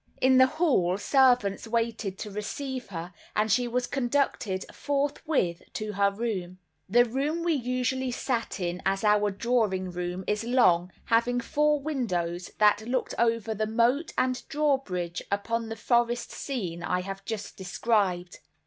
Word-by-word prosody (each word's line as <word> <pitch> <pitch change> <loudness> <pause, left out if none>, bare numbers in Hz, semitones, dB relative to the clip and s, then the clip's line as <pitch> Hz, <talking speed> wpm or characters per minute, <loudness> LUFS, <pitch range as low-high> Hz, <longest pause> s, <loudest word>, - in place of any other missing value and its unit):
In 260 0 +5
the 260 - +7
hall, 260 - +2
servants 245 -4 +3
waited 225 -4 -1
to 210 - -6
receive 255 +5 -4
her, 175 -1 -7 0.2
and 215 0 +2
she 245 +4 +3
was 245 +1 0
conducted 245 -7 -1
forthwith 280 - -1
to 215 -1 -3
her 200 0 +3
room. 200 -4 -4 0.3
The 240 +4 +5
room 285 +8 -1
we 340 -1 +2
usually 255 0 -1
sat 240 -3 -2
in 175 0 -2
as 195 +1 0
our 210 -1 +4
drawing 200 -3 0
room 180 +1 -4
is 210 +1 -1
long, 185 -8 +3
having 235 +2 +2
four 300 +4 +2
windows, 180 - -2
that 210 +1 +4
looked 255 0 -1
over 230 -2 +1
the 215 0 -1
moat 240 +8 +2
and 255 0 +1
drawbridge, 265 - 0
upon 225 +3 -1
the 225 - -4
forest 240 +1 +1
scene 185 -12 -4
I 180 +1 0
have 195 +1 -6
just 215 -1 -5
described. 185 -2 0
230 Hz, 150 wpm, -27 LUFS, 195-255 Hz, 0.3 s, the